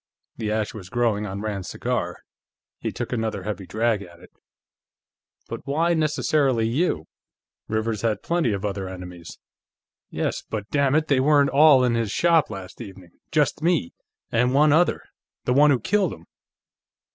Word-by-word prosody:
The 110 -2 -2
ash 110 -1 -1
was 95 -5 -9
growing 115 -4 0
on 100 +1 -5
Rand's 105 -3 -4
cigar; - - -3 0.6
he - - -3
took - - -5
another 110 -5 -2
heavy 100 -2 -5
drag 110 -1 0
at 85 -3 -12
it. - - -17 1.2
"But - - -7
why 165 +5 +2
necessarily 150 -6 +1
you? 115 - 0 0.6
Rivers 110 -1 -1
had 110 -3 -1
plenty 170 -8 +1
of 100 0 -3
other 100 -2 -3
enemies." 90 -2 -9 0.7
"Yes, - - -2
but, 105 -2 -4
dammit, 145 +2 +2
they 140 -3 +3
weren't 145 0 +4
all 140 -2 +6
in 125 -2 +2
his 115 -2 0
shop, 165 +6 +3
last 95 -4 -8
evening. 95 -3 -11 0.2
Just 150 -1 +1
me. 165 - +1 0.4
And 125 +3 +2
one 150 +1 +5
other. 175 +3 +2 0.4
The 125 - +2
one 145 +3 +6
who 135 -4 +3
killed 190 - +1
him." 85 - -13
115 Hz, 155 wpm, -24 LUFS, 100-145 Hz, 1.2 s, all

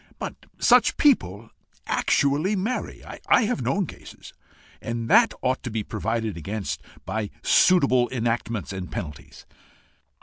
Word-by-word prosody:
But - - -7
such - - +4
people 115 - +2 0.3
actually 150 +9 +1
marry 215 +7 -3 0.3
I 235 - +6
have 230 +2 -1
known 200 -1 0
cases, - - -12 0.5
and 115 0 -4
that 230 0 +6
ought 130 0 0
to 125 - -5
be 110 -1 -3
provided 115 -1 -3
against 100 +5 -4 0.2
by 110 -2 -3
suitable 135 -9 +4
enactments 115 -4 -2
and 95 -1 -6
penalties." 75 -3 -8
120 Hz, 125 wpm, -24 LUFS, -, 0.5 s, I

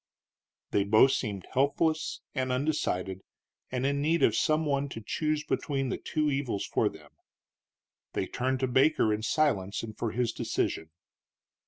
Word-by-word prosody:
They 100 - +3
both 110 +6 +5
seemed 100 -8 -2
helpless 155 +4 +1
and 130 -2 -1
undecided, 125 -10 -1 0.5
and 130 0 -1
in 140 0 +1
need 160 0 +2
of 110 - +4
some 155 +5 +2
one 140 -1 0
to 115 - -6
choose 155 +3 -1
between 135 -4 -1
two 155 -2 0
evils 135 -7 -1
for - - +1
them. - - -15 1.0
They - - -1
turned 130 +1 -1
to 130 - +2
Baker 130 -3 +3
in 105 - -2
silence 110 -7 +1
and 110 -1 -7
for 115 - -2
his 120 0 0
decision. 80 - -2
130 Hz, 150 wpm, -29 LUFS, 110-150 Hz, 1.0 s, both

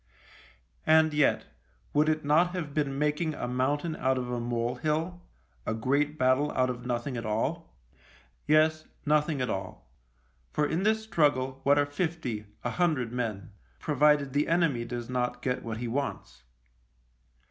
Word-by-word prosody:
And 160 0 +5
yet, 150 -1 +2 0.5
would 150 +1 +3
it 155 -1 0
not 170 +5 +3
have 155 -6 -4
been 140 -2 -1
making 150 +2 0
a - - -4
mountain 145 +6 0
out 130 -1 +1
of 125 -1 -3
a 120 - -1
mole 120 0 -1
hill 160 +5 -1 0.2
— 60 -1 -37
a 110 - 0
great 140 +6 0
battle 130 +3 +2
out 130 0 +2
of 125 0 -7
nothing 120 +1 -2
at 115 - -4
all? 135 +10 -2 0.7
Yes, 155 +1 +3 0.2
nothing 150 -1 +2
at 125 - -1
all; 95 -11 -6 0.6
for 150 - 0
in 160 +4 -1
this 220 +2 +2
struggle 140 -9 +1
what 140 +1 +4
are 145 - +4
fifty, 145 - -3 0.2
a 120 - -1
hundred 155 -9 +1
men 110 -6 -3
— - - -35
provided 150 -2 +3
the 145 +1 +1
enemy 165 -8 +2
does 120 0 -5
not 125 -1 -1
get 125 -1 -1
what 115 -1 -5
it 120 - -3
wants 140 - -4
140 Hz, 165 wpm, -29 LUFS, 125-155 Hz, 0.7 s, And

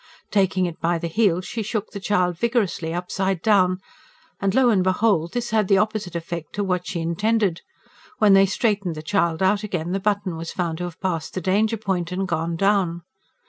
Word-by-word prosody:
Taking 190 -2 +2
it 170 -2 -5
by 170 +1 +1
the 165 - -5
heels 185 -1 +1
she 230 - -4
shook 215 0 -3
the 200 - -6
child 180 -3 +1
vigorously, 210 -6 0
upside 185 +2 -1
down; 185 -4 +4 0.6
and, 195 0 0
lo 260 -2 +5
and 195 -4 +3
behold! 185 -3 +1
this 240 -2 -2
had 215 -3 +2
the 195 - +4
opposite 210 -3 -1
effect 170 -1 -5
to 205 - -1
what 180 -2 -1
she 170 - -3
intended. 195 +2 0 0.6
When 205 -2 +5
they 195 0 +6
straightened 200 -4 0
the 155 - -7
child 170 -1 +1
out 200 +2 +3
again 180 -5 -3
the 195 - 0
button 200 -3 -1
was 165 0 -5
found 170 -3 -2
to 180 - -2
have 175 -2 -8
passed 165 -4 -2
the - - 0
danger 210 +5 +1
point 190 -5 -2
and 190 +1 -2
gone 165 0 -1
down. 185 -2 +1
190 Hz, 200 wpm, -23 LUFS, 170-205 Hz, 0.6 s, they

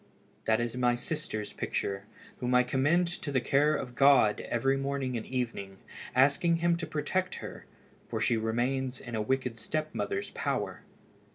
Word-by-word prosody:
That 110 0 +3
is 120 0 -2
my 125 -1 +3
sister's 120 -5 -4
picture, 100 0 -2 0.3
whom 125 0 +1
I 125 - +6
commend 145 +8 +2 0.2
to 145 - -3
the 130 - +3
care 145 +4 +3
of 125 -2 -4
God 135 -5 +5
every 135 +3 +2
morning 135 -2 -2
and 115 - -4
evening, 115 -6 -3 0.4
asking 145 +6 +4
Him 170 +1 +2
to 170 -2 -4
protect 155 +5 -1
her, - - -8 0.4
for 115 - -2
she 115 +2 +2
remains 125 +4 -1
in 120 - -9
a 110 - 0
wicked 125 0 -1
step 155 +6 -2
mother's 405 0 -2
power." - - -2
130 Hz, 165 wpm, -30 LUFS, 120-145 Hz, 0.4 s, I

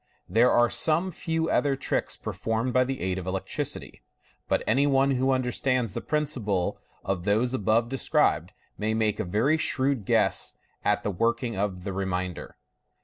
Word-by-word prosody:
There 115 +6 +4
are 120 -1 +4
some 165 +4 +1
few 165 -1 -2
other 140 -2 +2
tricks 135 - -2
performed 115 +3 -2
by 130 0 +4
the 135 0 -4
aid 95 0 -1
of 90 - -7
electricity, 95 0 -4 0.5
but - - +1
any 135 +6 +3
one 135 0 +3
who 130 0 +1
understands 130 -3 0
the - - -3
principle 125 - -1 0.3
of 95 -3 -2
those 110 +6 +1
above 115 0 +2
described 135 0 +1 0.3
may 110 +1 0
make 110 -2 0
a - - 0
very 110 - +1
shrewd 130 -7 +1
guess - - +2 0.3
at - - +1
the 105 - -1
working 115 +4 0
of 95 -2 -2
the 100 0 -4
remainder. 95 -2 -3
115 Hz, 160 wpm, -27 LUFS, 100-135 Hz, 0.5 s, There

